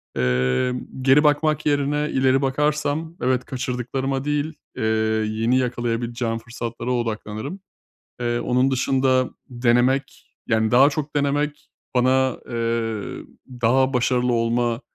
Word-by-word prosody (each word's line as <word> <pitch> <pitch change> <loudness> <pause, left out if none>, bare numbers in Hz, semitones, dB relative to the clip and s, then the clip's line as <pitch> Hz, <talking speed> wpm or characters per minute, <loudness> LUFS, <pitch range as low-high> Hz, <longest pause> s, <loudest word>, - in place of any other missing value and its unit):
Emm, 65 - 0
geri 135 +3 +5
bakmak 150 0 +2
yerine 150 +1 +1
ileri 130 0 +3
bakarsam, 150 +3 0
evet, 125 0 +1
kaçırdıklarıma 130 +1 -3
değil, 150 +1 -1 0.2
eee, - - -2 0.5
yeni 115 +4 +1
yakalayabileceğim 120 -2 -1
fırsatlara 120 +1 -5
odaklanırım. 115 - -3 0.6
Eee, 120 0 0
onun 125 +2 +1
dışında 130 0 +2 0.2
denemek, 125 +2 0
yani 110 -1 +1
daha 130 +4 +6
çok 150 0 -4
denemek 145 +1 -1 0.3
bana, 130 0 +3
eee, 115 -2 -2 0.4
daha 130 +3 +3
başarılı 125 0 +1
olma 115 +1 0
130 Hz, 110 wpm, -22 LUFS, 120-140 Hz, 0.6 s, daha